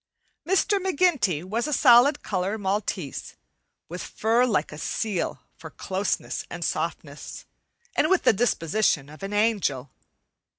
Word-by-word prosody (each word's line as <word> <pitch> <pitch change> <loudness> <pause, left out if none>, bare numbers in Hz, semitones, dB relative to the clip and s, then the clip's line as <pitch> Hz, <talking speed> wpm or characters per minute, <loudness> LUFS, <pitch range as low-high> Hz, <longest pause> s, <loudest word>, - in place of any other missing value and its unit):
Mr. 390 +2 +2
McGinty 325 - +1
was 220 +8 -2
a 300 - -2
solid 265 +2 +5
color 195 +2 -2
maltese, 195 - -3 0.5
with 180 +2 -6
fur 230 +3 +1
like 175 -10 0
a 150 - -8
seal 205 -1 -2
for 160 - -10
closeness 190 +5 -3
and - - -4
softness, - - -4 0.5
and - - +2
with 380 -1 +3
the - - +5
disposition 190 - +1
of 155 +4 -13
an 195 +1 -5
angel. 205 - 0
205 Hz, 130 wpm, -25 LUFS, 180-245 Hz, 0.5 s, solid